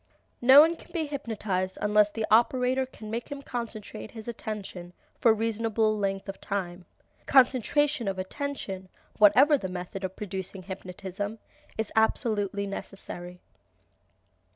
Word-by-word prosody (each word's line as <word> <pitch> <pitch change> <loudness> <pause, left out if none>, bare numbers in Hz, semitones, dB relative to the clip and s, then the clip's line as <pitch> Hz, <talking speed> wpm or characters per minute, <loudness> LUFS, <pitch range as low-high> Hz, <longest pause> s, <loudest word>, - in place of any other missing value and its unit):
No 265 +4 +10
one 330 +2 +4
can - - -17
be 330 -3 -1
hypnotized 210 -9 -3
unless 210 0 +4
the 220 +1 -2
operator 250 +3 +3
can 215 -4 -10
make 230 +1 -4
him 280 -1 -6
concentrate 220 -4 -6
his 220 -1 -10
attention 200 -6 -6 0.3
for 235 - +5
a - - +7
reasonable 220 0 +1
length 195 -1 -2
of 195 - -7
time. 180 -3 -4 0.4
Concentration 265 0 +3
of 195 -1 -1
attention, 190 -3 -5 0.3
whatever 260 +8 +6
the 190 - -4
method 180 +2 -6
of 190 0 -4
producing 190 -1 -5
hypnotism, 190 +2 -6 0.4
is 220 -1 -2
absolutely 210 -2 +1
necessary. 180 -2 -7
210 Hz, 130 wpm, -28 LUFS, 195-240 Hz, 0.4 s, No